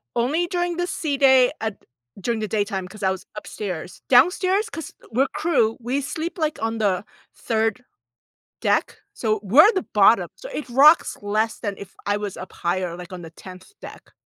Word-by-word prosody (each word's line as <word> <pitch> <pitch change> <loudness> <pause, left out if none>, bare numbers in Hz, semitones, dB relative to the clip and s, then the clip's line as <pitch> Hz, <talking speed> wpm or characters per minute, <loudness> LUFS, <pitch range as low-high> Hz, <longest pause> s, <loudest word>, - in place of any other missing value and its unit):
Only 300 +9 +1
during 350 -1 -2
the 350 0 -1
sea 295 -5 -2
day 265 -2 +5
at 220 -2 -5 0.4
during 235 +1 -1
the 215 - -2
daytime 200 -3 -2
'cause 210 +2 -11
I 190 - +3
was 190 -1 -6
upstairs. 185 -5 -6
Downstairs 370 - +3
'cause 325 -6 -7 0.2
we're 265 +5 +2
crew, 230 -10 +1
we 255 +4 -1
sleep, 320 +6 -4
like, 310 -2 -1
on 225 0 -1
the 200 -4 0 0.3
3rd 225 +2 -1 0.8
deck. - - 0 0.2
So 215 -1 -1
we're 290 - +6
the 375 - -1
bottom. 210 +3 +5
So - - -10
it 300 - -5
rocks 285 +6 +5
less 215 +2 -1
than 205 -3 -3
if 200 -1 -11
I 205 +1 0
was 205 -2 -5
up 185 - -9
higher, 175 0 -2
like, 180 +1 -10
on 180 - -8
the 165 - -9
10th 185 - -13
deck. - - -12
225 Hz, 180 wpm, -23 LUFS, 200-300 Hz, 0.8 s, we're